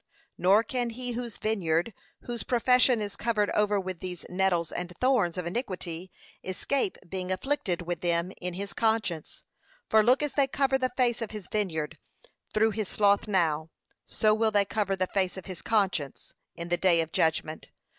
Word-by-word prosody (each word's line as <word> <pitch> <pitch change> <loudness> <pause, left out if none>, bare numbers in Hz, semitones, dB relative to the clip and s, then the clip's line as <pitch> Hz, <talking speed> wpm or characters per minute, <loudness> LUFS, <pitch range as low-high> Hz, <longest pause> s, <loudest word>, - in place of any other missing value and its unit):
Nor 195 +5 +4
can 245 0 -2
he 245 +2 -4
whose 235 -2 -5
vineyard, 190 -2 0 0.3
whose 240 -2 -5
profession 250 +1 +3
is 200 -1 -5
covered 210 -1 0
over 210 -1 +2
with 185 -2 -5
these 180 -1 -7
nettles 180 -2 +1
and 180 0 -4
thorns 240 -10 +2
of 180 - -3
iniquity, 180 -3 -4 0.3
escape 190 +4 -1
being 185 +1 -4
afflicted 185 -5 -1
with 175 -1 -4
them 170 +1 0
in 180 -1 -4
his 200 +1 -5
conscience: 220 -8 -1 0.4
for 220 - +5
look 250 +6 +4
as 295 - -2
they 280 -2 +3
cover 270 0 +1
the 255 -1 +1
face 240 -2 +2
of 225 - -3
his 210 -4 -8
vineyard 160 -7 -2 0.5
through 220 +1 +3
his 215 -2 -3
sloth 205 0 +3
now, 165 -5 +1 0.4
so 215 -1 +2
will 220 +1 +2
they 205 -2 +3
cover 200 -1 0
the 185 -1 0
face 190 0 -1
of 190 - -8
his 185 -3 -7
conscience, 190 - -1 0.2
in 170 0 -6
the 175 - +2
day 175 -2 +4
of 160 0 -4
judgment. 160 -1 0
200 Hz, 175 wpm, -28 LUFS, 175-225 Hz, 0.5 s, for